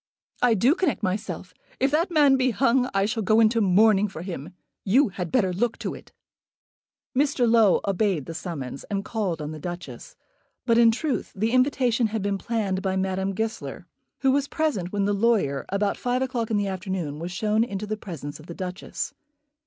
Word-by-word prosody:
"I 245 -2 +4
do 240 +8 +4
connect 345 - -1
myself. 185 -2 -3 0.3
If 270 +2 +2
that 330 +5 +2
man 295 -5 +5
be 260 -1 +2
hung 250 +1 +2
I 195 0 +2
shall 220 +2 -1
go 215 +2 +3
into 225 +1 +4
mourning 205 +1 +4
for 180 -4 -8
him. 175 -1 -7 0.3
You 245 +6 +4
had 180 -3 -5
better 190 -8 +2
look 230 +5 0
to - - -4
it." - - -12 1.0
Mr. 275 -2 +2
Low 225 -4 +5
obeyed 195 -6 +1
the 165 - -6
summons, 145 -5 -6
and 200 -1 -3
called 190 -9 -2
on 150 - -5
the 155 - -7
Duchess. 175 - -7 0.5
But, 230 -1 +4
in 230 -1 +7
truth, 260 +4 -1
the 220 +4 0
invitation 255 -2 +2
had 215 -1 -3
been 200 -1 -1
planned 200 -5 -1
by 190 -1 -1
Madame 190 0 -1
Goesler, 220 +2 -4 0.4
who 270 - +4
was 280 +1 +1
present 285 - -1
when 200 -1 0
the 205 - +1
lawyer, 200 -10 +1
about 200 +1 0
five 250 +1 0
o'clock 245 -4 -2
in 220 - +1
the 205 - 0
afternoon, 185 -6 -4
was 170 +2 -5
shown 215 +4 +1
into 205 -3 -4
the 215 +1 -2
presence 155 -9 -7
of 155 - -14
the 170 - -7
Duchess. 185 0 -5
210 Hz, 190 wpm, -25 LUFS, 185-240 Hz, 1.0 s, in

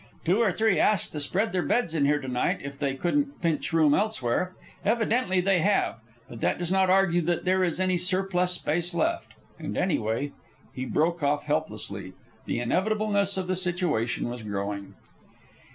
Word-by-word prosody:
Two 180 +6 +3
or 225 -5 +3
three 220 +1 +2
asked 210 -4 +2
to 150 - -4
spread 190 +8 0
their 185 - +1
beds 235 -3 0
in 150 -4 +2
here 145 +1 +3
to 135 - -7
night 125 -1 0
if 140 0 -7
they 140 -2 -1
couldn't 280 - -1
pinch 160 -5 -1
room 155 -3 +4
elsewhere. 185 - 0 0.3
Evidently 225 -1 +1
they 190 0 +3
have; 195 - +1 0.3
but 115 - -10
that - - +1
does 175 0 -3
not 190 -1 +3
argue 185 -2 +4
that 170 +2 -1
there 185 +1 +3
is 175 -1 -1
any 185 -1 +2
surplus 180 0 +1
space 175 +1 -1
left. 335 - -1 0.3
And - - -5
anyway 140 - 0 0.2
" - - -30
He 130 - -4
broke 165 +5 0
off 145 0 +1
helplessly. 105 -11 -3 0.3
The - - -1
inevitableness 200 - +1
of 190 - -1
the 185 +1 -1
situation 175 -12 0
was 120 0 -5
growing. 100 -1 -4
175 Hz, 180 wpm, -27 LUFS, 140-190 Hz, 0.3 s, room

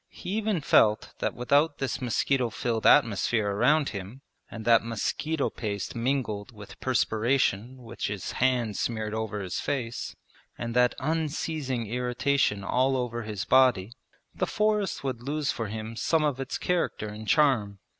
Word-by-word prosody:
He 180 - -8
even 210 -4 0
felt 110 -6 +3
that - - -1
without 145 +5 +2
this 135 -1 -3
mosquito 125 +1 +1
filled 115 0 -1
atmosphere 110 -1 +3
around 135 +8 +3
him, 100 +6 -7 0.3
and 110 -1 -8
that 115 -1 +5
mosquito 135 +7 -2
paste 100 -1 -4
mingled 115 -3 -2
with 105 -3 -12
perspiration 125 -1 +1
which 120 0 -4
his 100 -2 -4
hand 120 -5 +1
smeared 110 -2 -2
over 110 -2 -3
his 95 -2 -3
face, 120 -4 -3 0.4
and 115 0 -4
that 125 0 +4
unceasing 150 -4 -2
irritation 125 -1 0
all 130 +5 +2
over 120 -2 -2
his 105 -3 -4
body, 125 -5 +4 0.4
the 185 - -1
forest 210 -5 0
would 130 -4 -3
lose 145 +3 -1
for 115 - -4
him 110 +2 -6
some 160 +6 +1
of 145 -3 0
its 135 -1 -3
character 175 -11 -1
and 105 +1 -8
charm. 125 -9 +3
120 Hz, 150 wpm, -27 LUFS, 110-140 Hz, 0.4 s, that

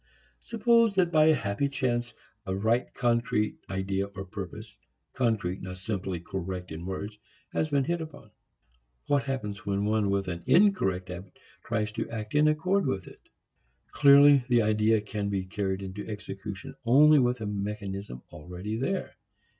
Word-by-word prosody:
Suppose 230 -1 +3
that 180 -2 +2
by 155 -1 +5
a 155 0 +5
happy 105 +4 -1
chance 120 -3 -1 0.3
a 95 - -1
right 110 +5 +1
concrete 120 -3 0
idea 95 +1 -1
or 95 -1 -8
purpose 105 +2 -8 0.3
concrete, 110 -7 0
not 95 0 -7
simply 95 -2 -3
correct 90 0 -5
in 85 +3 -6
words 100 +2 -5 0.3
has 155 - 0
been 140 -2 +2
hit 170 +4 -1
upon: 150 -9 -10 0.7
What 140 -1 +1
happens 105 -7 -4
when 100 0 -1
one 105 -1 +1
with 100 -1 0
an 85 -2 -4
incorrect 95 - +3
habit 90 +1 -9 0.3
tries 110 -2 -1
to 115 +1 -4
act 110 -2 -6
in 150 +1 +4
accord 180 +4 +1
with 95 -9 -2
it? - - -14 0.7
Clearly 140 -1 +7
the 120 -2 +4
idea 110 0 +3
can 105 -1 -3
be 95 -2 -2
carried 95 0 -3
into 95 +2 -7
execution 100 -2 -7
only 145 +5 +6
with 125 -1 +1
a 110 - -4
mechanism 100 - -5
already 90 +7 -6
there. 160 +11 -3
105 Hz, 155 wpm, -28 LUFS, 95-130 Hz, 0.7 s, Clearly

